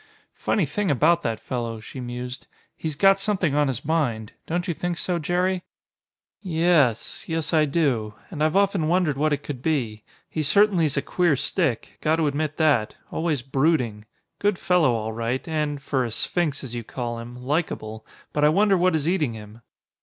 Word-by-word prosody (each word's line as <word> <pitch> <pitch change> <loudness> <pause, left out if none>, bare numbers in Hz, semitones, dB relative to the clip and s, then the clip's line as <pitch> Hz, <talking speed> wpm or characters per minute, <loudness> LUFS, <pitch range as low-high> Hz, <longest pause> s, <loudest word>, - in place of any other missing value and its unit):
"Funny 195 - 0
thing 190 +8 -1
about 160 +5 +3
that 115 -1 -2
fellow," 115 -3 -4
she 110 +5 -9
mused. 125 0 -6 0.3
"He's 155 -2 -4
got 195 +4 +5
something 195 -6 0
on 145 0 +3
his 130 -3 -3
mind. 125 -9 0 0.2
Don't 175 +2 -1
you 175 - 0
think 175 +1 -3
so, 175 0 0
Jerry?" 180 +3 0 0.8
"Y 175 -5 -4
es, 155 -9 +2
yes 165 -1 -2
I 155 -1 +5
do. 135 -9 0 0.2
And 155 -4 -2
I've 155 +2 +2
often 195 -5 +2
wondered 170 -4 +2
what 155 +3 +1
it 145 0 -1
could 135 -4 -6
be. 120 -9 -1 0.2
He 155 - -3
certainly's 170 -2 +3
a 140 - +1
queer 175 -5 +2
stick. 135 - -1
Got 155 +1 +3
to 165 -1 +1
admit 150 +1 -1
that. 145 -9 +2 0.2
Always 155 -6 -1
brooding. 130 -6 +1 0.3
Good 205 -2 +1
fellow 180 -8 +3
all 110 0 -3
right, 115 +5 -2
and, 150 -2 -1
for 135 -1 -1
a 120 - -2
'sphinx' 145 +6 -1
as 125 -3 -7
you 120 -1 -4
call 120 0 -4
him, 120 +1 -8
likable. 125 -5 -3 0.3
But 150 - +1
I 150 - +7
wonder 200 +5 +4
what 180 -1 +3
is 155 -1 -1
eating 160 -9 +1
him?" 110 +1 -11
150 Hz, 185 wpm, -24 LUFS, 125-170 Hz, 0.8 s, I